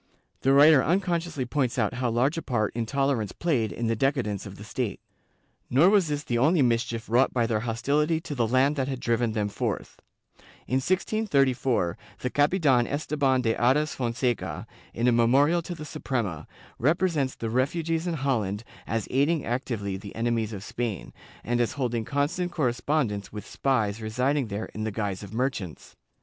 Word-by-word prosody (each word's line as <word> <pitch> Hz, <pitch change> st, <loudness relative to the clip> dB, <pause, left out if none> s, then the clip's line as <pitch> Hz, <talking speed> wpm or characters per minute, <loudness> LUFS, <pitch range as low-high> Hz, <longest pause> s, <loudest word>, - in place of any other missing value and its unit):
The 135 Hz, -, +3 dB
writer 140 Hz, 0 st, +7 dB
unconsciously 170 Hz, -5 st, 0 dB
points 130 Hz, -1 st, -1 dB
out 105 Hz, -4 st, +1 dB
how 125 Hz, 0 st, -1 dB
large 125 Hz, +6 st, +1 dB
a 165 Hz, -, -3 dB
part 110 Hz, -7 st, -1 dB
intolerance 120 Hz, -2 st, 0 dB
played 130 Hz, -11 st, 0 dB
in 120 Hz, -, -3 dB
the 115 Hz, 0 st, +1 dB
decadence 115 Hz, -6 st, -1 dB
of 100 Hz, -, -9 dB
the 105 Hz, -, -10 dB
state. 110 Hz, -1 st, -3 dB, 0.7 s
Nor 155 Hz, +10 st, +5 dB
was 200 Hz, -5 st, +4 dB
this 145 Hz, -1 st, -2 dB
the 120 Hz, -4 st, -1 dB
only 155 Hz, +3 st, +4 dB
mischief 115 Hz, -1 st, 0 dB
wrought 125 Hz, +4 st, +2 dB
by 120 Hz, -2 st, +3 dB
their 115 Hz, -2 st, 0 dB
hostility 145 Hz, +8 st, 0 dB
to 150 Hz, -, -6 dB
the 120 Hz, -5 st, +1 dB
land 135 Hz, +5 st, +2 dB
that 130 Hz, -1 st, 0 dB
had 135 Hz, -2 st, -3 dB
driven 115 Hz, -1 st, 0 dB
them 105 Hz, -2 st, 0 dB
forth. 100 Hz, -, -4 dB, 0.7 s
In 130 Hz, -, 0 dB
1634, 135 Hz, -, +1 dB, 0.2 s
the 125 Hz, -, -2 dB
Capitan 145 Hz, -5 st, +3 dB
Esteban 145 Hz, -3 st, +1 dB
de 115 Hz, -1 st, +1 dB
Ares 140 Hz, +5 st, +2 dB
Fonseca, 115 Hz, -, -2 dB, 0.3 s
in 120 Hz, +2 st, 0 dB
a -, -, +5 dB
memorial 135 Hz, +9 st, +4 dB
to 175 Hz, +1 st, -6 dB
the 155 Hz, -2 st, -8 dB
Suprema, 115 Hz, -, -3 dB, 0.3 s
represents 150 Hz, -1 st, +1 dB
the 115 Hz, -1 st, -4 dB
refugees 160 Hz, +6 st, 0 dB
in 170 Hz, -, -1 dB
Holland 115 Hz, -8 st, -1 dB, 0.2 s
as 110 Hz, -1 st, -2 dB
aiding 145 Hz, +4 st, +2 dB
actively 115 Hz, -5 st, -2 dB
the 100 Hz, +1 st, -10 dB
enemies 115 Hz, -1 st, 0 dB
of 100 Hz, -3 st, -6 dB
Spain, 115 Hz, -4 st, -4 dB, 0.3 s
and 120 Hz, +1 st, 0 dB
as 120 Hz, -, 0 dB
holding 120 Hz, -5 st, -2 dB
constant 160 Hz, +7 st, -1 dB
correspondence 125 Hz, -, -1 dB
with 105 Hz, -1 st, -7 dB
spies 115 Hz, -6 st, 0 dB
residing 125 Hz, +5 st, 0 dB
there 105 Hz, +1 st, -4 dB
in 110 Hz, -, -4 dB
the 110 Hz, -, -1 dB
guise 100 Hz, -3 st, -3 dB
of 100 Hz, -2 st, -9 dB
merchants. 110 Hz, -, -3 dB
125 Hz, 170 wpm, -26 LUFS, 115-145 Hz, 0.7 s, writer